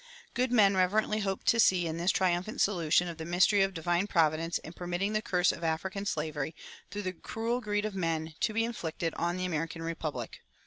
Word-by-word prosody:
Good 250 0 0
men 200 -5 +5
reverently 210 +3 +2
hoped 195 -2 -2
to 230 - +3
see 185 -5 +4
in 160 0 -3
this 175 +2 0
triumphant 185 +1 +1
solution 175 -3 +2
of 170 -1 -7
the - - -4
mystery 180 +4 +3
of 195 0 +1
divine 175 +3 0
providence 165 -2 +2
in 160 - -10
permitting 180 +4 -2
the 215 - +1
curse 180 -3 +2
of 170 - -8
African 190 +5 -2
slavery, 155 -2 -2 0.3
through 205 0 -5
the 185 -1 -2
cruel 230 +7 -3
greed 205 -2 -1
of 215 - -3
men, 165 -3 -2
to 220 - +1
be 225 +1 +1
inflicted 165 -7 -3
on 175 +1 -1
the 185 - -2
American 165 -1 -3
republic. 155 -7 -4
180 Hz, 200 wpm, -30 LUFS, 165-205 Hz, 0.3 s, men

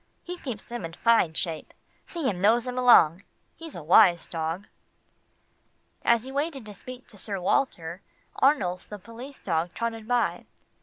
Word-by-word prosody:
He 355 - -6
keeps 240 -7 -5
them 240 -4 -7
in 165 0 -6
fine 225 -7 +3
shape. 160 -1 -4 0.3
See 335 -6 -2
him 180 -6 -1
nose 225 +4 +4
them 250 0 -5
along. 215 -9 +6 0.3
He's 325 -3 -9
a 170 - -7
wise 175 +1 +6
dog." 165 +4 -4 1.4
As 235 -1 +3
he 265 - -7
waited 280 -3 -2
to 210 - -9
speak 250 +5 -10
to 205 - -13
Sir 195 0 -2
Walter, 180 -4 -1 0.4
Arnulf 190 -11 +2
the 210 - -6
police 230 +7 -10
dog 170 -1 -2
trotted 225 -2 -3
by. 245 -1 0
220 Hz, 160 wpm, -26 LUFS, 175-250 Hz, 1.4 s, along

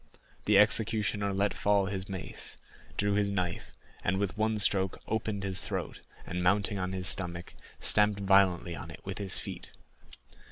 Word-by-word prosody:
The - - +5
executioner 105 -1 +3
let 100 +1 0
fall 100 -1 +2
his 95 0 -4
mace, 95 -2 -2 0.4
drew 100 0 +1
his 100 0 +1
knife, 90 -3 -3 0.3
and 90 +2 +1
with 100 -1 -2
one 110 0 0
stroke 95 -2 +2
opened 110 -2 -2
his 95 -1 +1
throat, - - -4 0.2
and 90 +1 -4
mounting 100 +3 +2
on 90 0 -2
his 95 -1 -4
stomach, 85 -2 -2 0.3
stamped 105 -1 +4
violently 95 -3 +3
on - - -8
it - - -11
with - - -5
his 100 -2 -1
feet. - - -7
100 Hz, 160 wpm, -30 LUFS, 95-105 Hz, 0.4 s, The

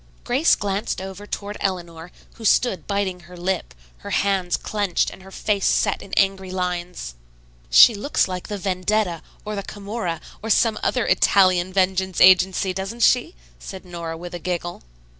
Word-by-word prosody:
Grace 265 +7 +3
glanced 200 0 -2
over 190 +2 -8
toward 205 0 -5
Eleanor, 175 -3 -4 0.3
who 230 - -11
stood 195 -6 +2
biting 200 -2 -1
her 180 +1 -14
lip, 185 +1 -3 0.2
her - - -9
hands 190 -3 +1
clenched 205 -4 -1
and - - -13
her 190 - -13
face 200 0 -1
set - - +1
in 195 - -12
angry 195 -1 +1
lines. 180 - -4 0.6
"She 145 - +8
looks 210 +4 0
like 185 -1 -5
the 205 - -4
'Vendetta' 185 -1 -1 0.2
or 210 0 -4
the 200 - -3
'Camorra' 200 -4 -5 0.2
or 225 - -5
some 225 +1 +3
other 250 - 0
Italian 185 -2 +3
vengeance 190 -1 0
agency, 185 +1 +5
doesn't 195 +5 -3
she?" 255 +8 +3 0.2
said 190 -1 -9
Nora 170 -2 -6
with 175 +1 -9
a 175 - -5
giggle. 175 0 -4
190 Hz, 160 wpm, -22 LUFS, 180-205 Hz, 0.6 s, She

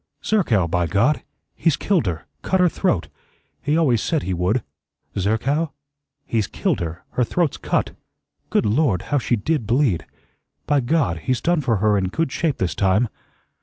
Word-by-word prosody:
"Zerkow, 120 - +2
by 85 0 0
God! 100 - +2 0.3
he's 165 -5 +2
killed 185 - +1
her. 80 -3 -3 0.2
Cut 190 - +1
her 180 -1 +5
throat. 160 - 0 0.5
He 150 +2 +1
always 130 -9 +3
said 160 -4 0
he 95 - -2
would." 90 +7 0 0.5
"Zerkow?" 130 - 0 0.5
"He's 110 -4 0
killed - - -1
her. 85 0 -5
Her 125 - +1
throat's 165 +5 0
cut. - - -1 0.6
Good - - +2
Lord, 110 - +2
how 145 - 0
she 120 - +1
did 120 +1 -1
bleed! 120 - +1 0.6
By 145 -1 +3
God! 120 - +1
he's 125 +9 -1
done 170 +2 +1
for 120 -5 +1
her 105 0 +3
in 95 - 0
good 155 - -1
shape 160 -3 0
this 95 -2 -1
time." 100 +4 +2
120 Hz, 165 wpm, -22 LUFS, 95-155 Hz, 0.6 s, her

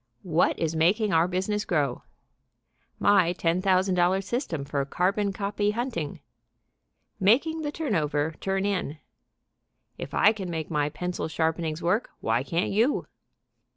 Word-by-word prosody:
"What 170 -2 +2
Is 165 -1 -1
Making 195 +6 +2
Our 165 +1 +4
Business 190 +3 -1
Grow;" 145 -7 0 1.0
"My 185 -4 +4
$10,000 185 +1 +2
System 185 - -3
of 140 -1 -1
Carbon 200 +5 +1
Copy 205 +1 -1
Hunting;" 225 - -3 1.0
"Making 285 - +3
the 295 -1 -2
Turn 300 -7 -3
Over 150 -2 0
Turn 195 0 -1
In;" 185 -7 -2 1.0
"If - - -6
I 210 - +6
Can 195 -4 -6
Make 160 -2 -4
My 150 -1 +1
Pencil 180 +4 -4
Sharpenings 160 0 -1
Work, 195 +8 +1
Why 115 +2 +1
Can't 165 +6 -1
You?" 230 +8 +2
180 Hz, 130 wpm, -26 LUFS, 160-205 Hz, 1.0 s, I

